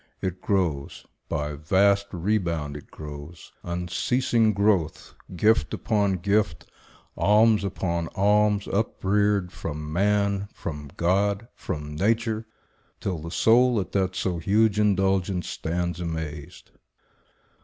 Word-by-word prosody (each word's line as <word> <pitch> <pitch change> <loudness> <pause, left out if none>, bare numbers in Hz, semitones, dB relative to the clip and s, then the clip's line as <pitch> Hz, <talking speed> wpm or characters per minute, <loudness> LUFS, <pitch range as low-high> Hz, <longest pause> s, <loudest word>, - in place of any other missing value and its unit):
It 95 -1 -4
grows— 85 -9 -1 0.2
By 75 0 -2
vast 100 +7 +2
rebound 85 -6 -1
it 75 - -10
grows, 75 +2 -10
unceasing 110 +7 +1
growth; 100 -6 0 0.2
Gift 110 +5 +2
upon 100 -3 +1
gift, 95 -2 0 0.5
alms 105 +1 +4
upon 85 -3 -2
alms, 105 +1 +3
upreared, 100 -2 +1
From 75 +1 -6
man, 100 +1 +1
from 75 -3 -6
God, 100 +5 +1
from 75 0 -5
nature, 110 +4 0 0.5
till 90 -4 -3
the 80 +2 -7
soul 115 +7 +4
At 95 - -4
that 95 -2 0
so 90 -3 -1
huge 105 +4 +2
indulgence 95 -2 +1
stands 85 +1 -3
amazed. 80 -4 -6
95 Hz, 110 wpm, -25 LUFS, 85-105 Hz, 0.5 s, alms